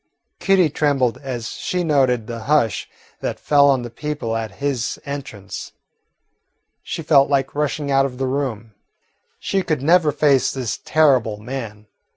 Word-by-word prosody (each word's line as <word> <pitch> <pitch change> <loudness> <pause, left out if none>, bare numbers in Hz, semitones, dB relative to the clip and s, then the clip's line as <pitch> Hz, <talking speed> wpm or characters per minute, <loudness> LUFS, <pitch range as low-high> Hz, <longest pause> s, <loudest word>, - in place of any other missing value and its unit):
Kitty 185 -5 +3
trembled 135 -6 +1
as 125 -4 -5
she 180 -1 -3
noted 130 -7 +2
the 115 -1 -7
hush 145 -6 +1 0.3
that - - -4
fell 140 -1 +4
on 130 -3 +2
the 120 - -7
people 145 -4 -4
at 110 -3 -4
his 135 0 -2
entrance. 140 -9 -7 1.1
She 165 - -5
felt 145 -3 +4
like 140 -1 +1
rushing 145 0 -1
out 135 0 +4
of 125 -2 -10
the 135 - -1
room. 130 -5 -3 0.6
She 195 - -1
could 155 -7 -2
never 165 0 +4
face 140 -2 +3
this 130 -5 -3
terrible 130 -9 +3
man. 110 -2 -7
135 Hz, 150 wpm, -21 LUFS, 120-150 Hz, 1.1 s, fell